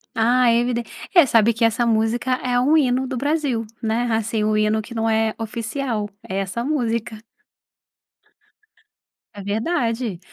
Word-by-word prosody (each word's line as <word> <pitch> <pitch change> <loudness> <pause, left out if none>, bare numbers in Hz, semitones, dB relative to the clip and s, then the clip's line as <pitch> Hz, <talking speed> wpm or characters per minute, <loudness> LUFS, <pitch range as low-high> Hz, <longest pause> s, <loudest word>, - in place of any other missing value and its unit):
Ah, 245 +3 +3
é 230 - +3
eviden 240 0 -1 0.3
é, 345 - +8
sabe 230 -2 +4
que 230 +1 +1
essa 230 +1 +1
música 230 +3 +1
é 245 -1 +1
um 290 +6 +4
hino 260 -2 +1
do 260 -1 -4
Brasil, 280 -4 -1 0.2
né, 225 +1 0
assim, 220 0 0
o 215 0 +1
hino 215 +1 +2
que 235 +3 -11
não 225 -1 0
é 220 0 +1
oficial 225 0 -3 0.2
é 190 - -3
essa 195 +4 -3
música. 235 -5 -2 2.1
É 205 - -8
verdade, 225 - -2
230 Hz, 150 wpm, -21 LUFS, 220-250 Hz, 2.1 s, é